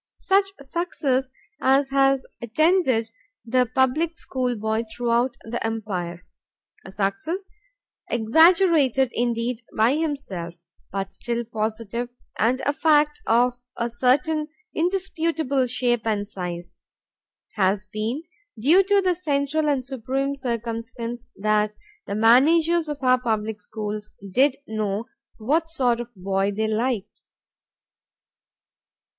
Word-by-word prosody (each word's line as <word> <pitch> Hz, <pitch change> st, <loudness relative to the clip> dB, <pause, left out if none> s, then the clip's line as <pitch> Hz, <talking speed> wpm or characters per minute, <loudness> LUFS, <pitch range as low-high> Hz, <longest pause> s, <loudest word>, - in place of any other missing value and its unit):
Such 390 Hz, +1 st, +3 dB, 0.2 s
success 270 Hz, -4 st, -1 dB, 0.3 s
as 270 Hz, +1 st, +3 dB
has 270 Hz, -1 st, +3 dB, 0.2 s
attended 255 Hz, -, +2 dB, 0.3 s
the 250 Hz, +1 st, +2 dB
public 265 Hz, +8 st, +1 dB
schoolboy 230 Hz, -4 st, -1 dB
throughout 240 Hz, +1 st, 0 dB
the 235 Hz, +1 st, -4 dB
Empire, 185 Hz, -6 st, -4 dB, 0.6 s
a 190 Hz, -, -10 dB
success 205 Hz, -, -2 dB, 0.6 s
exaggerated 280 Hz, -, +4 dB
indeed 235 Hz, 0 st, -1 dB, 0.2 s
by 225 Hz, +4 st, +4 dB
himself, 200 Hz, -, -4 dB, 0.3 s
but 195 Hz, 0 st, -4 dB
still 235 Hz, 0 st, -2 dB
positive 225 Hz, +2 st, -3 dB, 0.3 s
and 250 Hz, +4 st, +2 dB
a 285 Hz, -, 0 dB
fact 300 Hz, -1 st, +3 dB
of 245 Hz, +2 st, +3 dB, 0.2 s
a 235 Hz, 0 st, -1 dB
certain 290 Hz, +6 st, +2 dB, 0.3 s
indisputable 325 Hz, -6 st, 0 dB
shape 240 Hz, -1 st, +1 dB
and 205 Hz, -2 st, 0 dB
size, 175 Hz, -3 st, -6 dB, 0.8 s
has 195 Hz, 0 st, +1 dB
been 220 Hz, -, -3 dB, 0.3 s
due 300 Hz, -, +5 dB
to 400 Hz, +1 st, +3 dB
the 370 Hz, -1 st, +2 dB
central 300 Hz, -2 st, 0 dB
and 265 Hz, -3 st, 0 dB
supreme 270 Hz, +2 st, -2 dB
circumstance 235 Hz, -1 st, -4 dB
that 210 Hz, +1 st, +1 dB, 0.3 s
the 200 Hz, -, -3 dB
managers 315 Hz, +9 st, +4 dB
of 295 Hz, -, -3 dB
our 255 Hz, 0 st, +4 dB
public 220 Hz, -3 st, -2 dB
schools 210 Hz, 0 st, -6 dB, 0.2 s
did 265 Hz, +6 st, +4 dB
know 215 Hz, 0 st, -2 dB, 0.3 s
what 305 Hz, +9 st, 0 dB
sort 250 Hz, -7 st, +1 dB
of 240 Hz, 0 st, -5 dB
boy 195 Hz, +1 st, 0 dB
they 220 Hz, +2 st, -1 dB
liked. 220 Hz, -1 st, -2 dB
245 Hz, 110 wpm, -24 LUFS, 220-285 Hz, 0.8 s, due